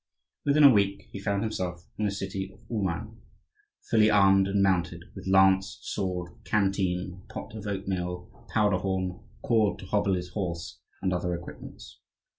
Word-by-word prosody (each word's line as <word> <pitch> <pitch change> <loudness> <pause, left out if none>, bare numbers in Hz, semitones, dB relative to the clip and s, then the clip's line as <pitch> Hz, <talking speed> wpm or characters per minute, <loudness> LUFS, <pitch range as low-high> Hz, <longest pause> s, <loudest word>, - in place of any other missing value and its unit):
Within 145 +1 +4
a 140 - +10
week 100 -1 +1
he 100 - -6
found 100 +1 0
himself 90 -5 -3
in 105 - -1
the 100 - +1
city 95 -1 -4
of - - -20
Ouman, 95 -7 -3 0.7
fully 110 -1 +5
armed, 95 -2 +5
and 100 0 +2
mounted, 90 -3 +1
with 95 -1 -9
lance, 95 0 +4
sword, 90 -2 -3
canteen, 95 -3 0
pot - - -7
of 110 -1 -7
oatmeal, 90 -3 -3 0.2
powder 105 -4 +3
horn, 95 -1 -2 0.2
cord 110 -4 +2
to - - -10
hobble 100 0 +1
his 90 0 -4
horse, 85 -4 -4 0.2
and 95 -1 +1
other 90 0 -1
equipments. 85 0 -10
95 Hz, 155 wpm, -28 LUFS, 90-100 Hz, 0.7 s, a